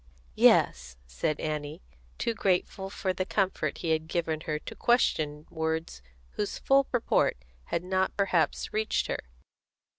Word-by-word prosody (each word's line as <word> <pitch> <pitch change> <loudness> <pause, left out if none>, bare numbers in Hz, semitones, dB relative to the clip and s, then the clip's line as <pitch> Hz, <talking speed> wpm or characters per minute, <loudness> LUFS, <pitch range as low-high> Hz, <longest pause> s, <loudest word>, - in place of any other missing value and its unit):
"Yes," 60 0 +4
said 65 - -2
Annie, 150 - -4 0.3
too 230 - 0
grateful 190 -1 0
for 190 -1 -2
the 185 - -1
comfort 185 -6 -1
he 165 - -2
had 160 0 0
given 160 -2 -1
her 155 -1 0
to - - -8
question 155 -11 +1
words 160 - -2 0.3
whose 205 - -3
full 275 0 +4
purport 245 - +1 0.3
had 170 - -2
not 190 +1 0
perhaps 190 -4 +1
reached 215 0 +1
her. - - -2
165 Hz, 140 wpm, -29 LUFS, 155-195 Hz, 0.3 s, Yes